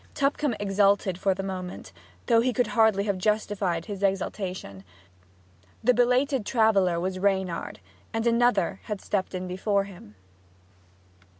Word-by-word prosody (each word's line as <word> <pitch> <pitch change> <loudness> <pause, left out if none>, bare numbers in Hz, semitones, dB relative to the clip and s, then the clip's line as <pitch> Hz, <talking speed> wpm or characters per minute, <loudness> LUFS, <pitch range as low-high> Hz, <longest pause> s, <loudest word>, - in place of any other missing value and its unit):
Tupcombe 280 -2 0
exulted 195 -2 +2
for 195 -1 +1
the 195 - -4
moment, 185 - -6 0.3
though 230 -1 +4
he 250 +1 0
could 245 +2 +2
hardly 220 -4 +3
have 200 -2 -1
justified 200 -4 0
his 200 -2 -6
exultation. 190 - -2 1.0
The 250 +2 +5
belated 250 +1 +2
traveller 200 -7 +2
was 185 +1 -3
Reynard; 190 -3 -1 0.3
and 225 0 -2
another 230 -5 +2
had 210 -3 -4
stepped 190 -2 -2
in 185 0 -4
before 200 +2 0
him. 180 - -13
200 Hz, 130 wpm, -26 LUFS, 185-225 Hz, 1.0 s, The